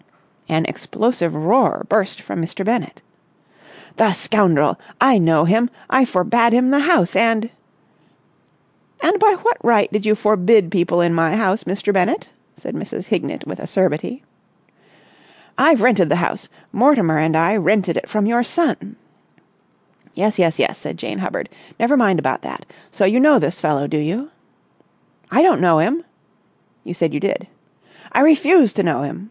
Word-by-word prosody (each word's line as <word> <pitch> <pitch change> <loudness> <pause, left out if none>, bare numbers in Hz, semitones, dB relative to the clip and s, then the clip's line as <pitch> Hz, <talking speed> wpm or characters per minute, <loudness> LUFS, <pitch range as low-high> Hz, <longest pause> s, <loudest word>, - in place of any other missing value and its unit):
An 160 0 0
explosive 215 -7 -2
roar 210 +11 +1
burst 205 -2 -1
from 170 - -6
Mr. 180 +4 -5
Bennett. 235 +3 -3 0.9
"The 220 -3 +3
scoundrel! 175 -7 +1 0.2
I 255 -3 +4
know 165 -3 +2
him! 225 +7 +2 0.2
I 260 0 +4
forbade 235 +3 +1
him 255 +2 +2
the 285 - +3
house, 290 - +2
and...." 230 0 +1 1.5
"And 390 +4 +2
by 425 -2 +4
what 475 +2 +1
right 225 -3 +2
did 210 -1 -1
you 215 - +3
forbid 210 -3 +2
people 175 -2 +1
my 165 +2 +1
house, 205 -1 -1
Mr. 200 +2 -2
Bennett?" 200 - -1 0.2
said - - -8
Mrs. - - -7
Hignett - - -3
with - - -8
acerbity. 190 - -2 1.3
"I've 300 -10 +3
rented 200 -10 +3
the 145 - +2
house, 170 0 -3 0.2
Mortimer 215 - +2
and 160 +1 +1
I 170 +6 +2
rented 195 -2 0
it - - -5
from 210 -1 -1
your 235 +2 +1
son...." 335 +7 -2 1.2
"Yes, 210 -1 -1
yes, 165 -3 +1
yes," - - -1
said - - -8
Jane - - -6
Hubbard. - - -5 0.3
"Never 235 +5 +2
mind 210 -9 +2
about 155 - -2
that. - - -9 0.3
So 200 - 0
you 215 +6 +2
know 290 +1 +5
this 180 -6 -2
fellow, 145 -2 0
do 155 - -3
you?" 210 - -4 1.0
"I - - +3
don't 365 -2 +3
know 170 -3 +4
him!" 255 - 0 0.8
"You - - -8
said - - -1
you - - -2
did." - - -3 0.7
"I - - +2
refuse 300 - +4
to 200 - -1
know 160 -6 -1
him!" 140 - -6
210 Hz, 160 wpm, -18 LUFS, 175-245 Hz, 1.5 s, know